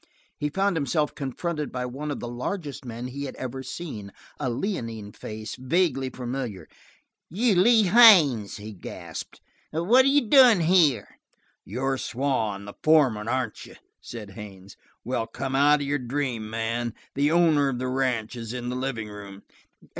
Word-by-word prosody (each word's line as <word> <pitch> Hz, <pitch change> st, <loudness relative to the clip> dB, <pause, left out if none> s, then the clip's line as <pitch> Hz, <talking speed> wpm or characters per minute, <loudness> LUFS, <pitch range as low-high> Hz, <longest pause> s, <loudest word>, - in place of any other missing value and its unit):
He 150 Hz, -, -2 dB
found 195 Hz, +4 st, 0 dB
himself 150 Hz, 0 st, 0 dB
confronted 150 Hz, +3 st, -4 dB
by 125 Hz, 0 st, -3 dB
one 135 Hz, +5 st, -5 dB
of 145 Hz, -, -3 dB
the 120 Hz, -, -5 dB
largest 140 Hz, +5 st, -5 dB
men 120 Hz, 0 st, -6 dB
he 140 Hz, +3 st, -5 dB
had 135 Hz, -, -7 dB
ever 130 Hz, +1 st, -5 dB
seen, 120 Hz, -10 st, -7 dB, 0.3 s
a 130 Hz, -, -1 dB
leonine 115 Hz, -, -4 dB
face, 110 Hz, +1 st, -7 dB
vaguely 135 Hz, -1 st, 0 dB
familiar. 125 Hz, -5 st, -5 dB, 0.6 s
"You 215 Hz, +6 st, +2 dB
Lee 220 Hz, +5 st, +5 dB
Haines!" 180 Hz, -, +6 dB
he 105 Hz, +1 st, -8 dB
gasped. 95 Hz, -, -9 dB, 0.3 s
"What 210 Hz, +12 st, +4 dB
are -, -, +4 dB
you 280 Hz, -3 st, +3 dB
doin' 245 Hz, -6 st, +7 dB
here?" 160 Hz, -, +2 dB, 0.4 s
"You're 130 Hz, +5 st, -2 dB
Swann, 115 Hz, -7 st, -2 dB
the 100 Hz, -, -9 dB
foreman, 135 Hz, -9 st, +3 dB
aren't 125 Hz, -2 st, -2 dB
you?" -, -, -14 dB, 0.3 s
said 105 Hz, -4 st, -9 dB
Haines. 100 Hz, -2 st, -11 dB, 0.3 s
"Well, 115 Hz, -2 st, -2 dB
come 130 Hz, +3 st, -4 dB
out 145 Hz, +2 st, +4 dB
of -, -, -2 dB
your 145 Hz, +1 st, 0 dB
dream, 125 Hz, -3 st, -3 dB
man. 115 Hz, +1 st, -2 dB, 0.2 s
The 145 Hz, +1 st, +2 dB
owner 160 Hz, -4 st, +3 dB
of 130 Hz, -, -3 dB
the 130 Hz, +1 st, -3 dB
ranch 125 Hz, -3 st, -1 dB
is 115 Hz, -1 st, -6 dB
in 125 Hz, -1 st, -4 dB
the 125 Hz, -, -3 dB
living 125 Hz, -4 st, -3 dB
room." 100 Hz, -1 st, -10 dB
130 Hz, 160 wpm, -25 LUFS, 115-155 Hz, 0.6 s, doin